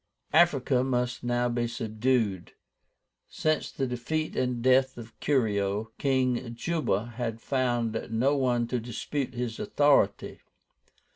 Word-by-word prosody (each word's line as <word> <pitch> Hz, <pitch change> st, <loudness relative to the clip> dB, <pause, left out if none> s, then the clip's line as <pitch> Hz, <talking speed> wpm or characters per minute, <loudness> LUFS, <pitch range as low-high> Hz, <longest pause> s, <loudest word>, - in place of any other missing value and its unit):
Africa 135 Hz, -6 st, +4 dB
must 125 Hz, -2 st, -1 dB
now 120 Hz, 0 st, +1 dB
be 120 Hz, 0 st, -1 dB
subdued. 110 Hz, -4 st, -1 dB, 0.8 s
Since 155 Hz, 0 st, -1 dB
the 135 Hz, -, -2 dB
defeat 130 Hz, +6 st, -3 dB
and 125 Hz, -1 st, 0 dB
death 130 Hz, 0 st, +3 dB
of 115 Hz, -1 st, -10 dB
Curio, 105 Hz, -5 st, 0 dB
King 130 Hz, -3 st, 0 dB
JUBA 120 Hz, -, -1 dB
had 115 Hz, -2 st, -3 dB
found 120 Hz, -4 st, -1 dB
no 125 Hz, +6 st, +2 dB
one 125 Hz, -3 st, +1 dB
to 125 Hz, -, 0 dB
dispute 125 Hz, +3 st, -4 dB
his 120 Hz, -2 st, -3 dB
authority. 145 Hz, -9 st, +2 dB
125 Hz, 120 wpm, -28 LUFS, 115-130 Hz, 0.8 s, Africa